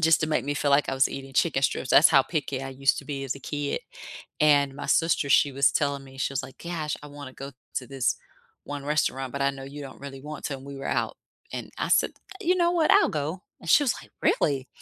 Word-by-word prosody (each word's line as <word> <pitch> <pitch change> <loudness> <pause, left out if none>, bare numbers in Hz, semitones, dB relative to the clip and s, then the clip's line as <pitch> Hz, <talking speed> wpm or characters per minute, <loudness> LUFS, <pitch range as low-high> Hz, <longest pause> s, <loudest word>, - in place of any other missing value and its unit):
just 160 0 +5
to 155 - +1
make 155 - +1
me 145 +1 -1
feel 145 +1 0
like 140 +1 +4
I - - 0
was 130 0 +4
eating 135 0 -8
chicken 135 -2 +2
strips. 130 -1 0
That's 155 - +8
how 140 -4 +6
picky 140 -3 -3
I 135 - -5
used 135 +1 +2
to - - -6
be 135 -1 -4
as 130 - -2
a 140 - -9
kid. 145 +1 -3 0.6
And 145 -2 +4
my - - -6
sister, 165 -2 +2
she 140 +1 +4
was 140 +1 +4
telling 140 -1 0
me, 135 0 -14
she 135 - -1
was 135 - -1
like, 130 - -11
"Gosh. 165 -3 -3
I 150 - -9
wanna 145 -2 -9
go 140 0 -8 0.2
to 125 - -3
this 135 -1 0 0.5
one 145 -1 -6
restaurant, 135 -3 0
but 140 0 -2
I 140 - +3
know 135 -1 -9
you 145 +2 -8
don't 135 -2 -10
really 135 -1 -8
want 150 +1 -8
to," 140 - -3
and 130 - -13
we 140 0 -8
were 135 - -5
out, - - -1 0.4
and - - -5
I - - -1
said, - - +3 0.3
"You 360 -2 +2
know 345 -1 +3
what? 335 -3 +3
I'll - - +6
go," 155 +5 -3 0.2
and 170 - -10
she - - +7
was 250 - +2
like, - - -17
"Really?" 135 -3 +1
140 Hz, 260 wpm, -26 LUFS, 135-150 Hz, 0.6 s, That's